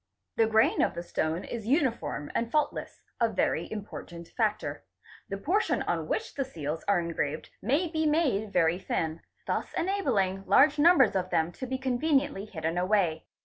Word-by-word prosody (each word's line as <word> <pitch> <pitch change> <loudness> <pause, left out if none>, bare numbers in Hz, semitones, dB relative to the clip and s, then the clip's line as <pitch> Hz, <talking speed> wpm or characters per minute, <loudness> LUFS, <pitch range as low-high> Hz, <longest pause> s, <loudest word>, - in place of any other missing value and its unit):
The 225 - +3
grain 220 0 +3
of - - +1
the 170 - -4
stone 165 0 -2
is 225 -3 -6
uniform 255 - 0
and 230 - -1
fault 300 -1 +2
less, - - -8 0.2
a 230 -1 +3
very 185 -5 -1
important 180 -5 -7
factor. 215 -3 -1 0.5
The 195 - -3
portion 375 - +1
on - - -2
which 445 - -2
the 280 - -1
seals 160 - -5
are 200 -3 +4
engraved 160 -3 -3
may 285 - +1
be 315 -1 0
made 265 -10 +1
very 165 -1 +2
thin, 160 -3 -2 0.2
thus - - -2
enabling 215 - 0
large 295 +1 +5
numbers 295 - +6
of 185 -1 0
them 160 0 +1
to 260 +8 -7
be 260 +1 -2
conveniently 265 -3 0
hidden 165 -4 -3
away. 180 -4 +1
215 Hz, 170 wpm, -28 LUFS, 175-275 Hz, 0.5 s, numbers